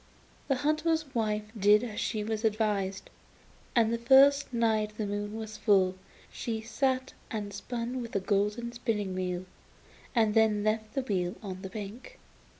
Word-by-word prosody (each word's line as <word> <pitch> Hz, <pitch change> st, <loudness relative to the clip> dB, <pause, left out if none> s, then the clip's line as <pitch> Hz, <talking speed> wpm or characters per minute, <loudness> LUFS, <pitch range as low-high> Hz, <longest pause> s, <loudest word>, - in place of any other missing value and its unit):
The 270 Hz, -, +2 dB
hunter's 310 Hz, +1 st, 0 dB
wife 215 Hz, -3 st, 0 dB
did 210 Hz, +1 st, +5 dB
as 220 Hz, -4 st, -4 dB
she 215 Hz, -2 st, -1 dB
was 220 Hz, +1 st, -3 dB
advised, 205 Hz, -3 st, 0 dB, 0.6 s
and 230 Hz, -1 st, +4 dB
the 235 Hz, -, -1 dB
first 275 Hz, +4 st, +6 dB
night 220 Hz, -3 st, +1 dB
the 215 Hz, -, -1 dB
moon 205 Hz, +1 st, -3 dB
was 220 Hz, -1 st, -6 dB
full 190 Hz, -4 st, +3 dB, 0.4 s
she 225 Hz, -2 st, -3 dB
sat 260 Hz, +3 st, -1 dB, 0.2 s
and 205 Hz, -2 st, -4 dB
spun 245 Hz, +4 st, -4 dB
with 230 Hz, -3 st, -7 dB
a -, -, +3 dB
golden 210 Hz, +4 st, 0 dB
spinning 210 Hz, -5 st, -2 dB
wheel, 180 Hz, -1 st, -2 dB, 0.7 s
and 220 Hz, -3 st, +3 dB
then 215 Hz, -2 st, +3 dB
left 215 Hz, 0 st, -1 dB
the 270 Hz, -, 0 dB
wheel 185 Hz, -6 st, -1 dB
on 190 Hz, -2 st, -6 dB
the 190 Hz, -, -6 dB
bank. 215 Hz, -, -8 dB
220 Hz, 155 wpm, -30 LUFS, 205-235 Hz, 0.7 s, first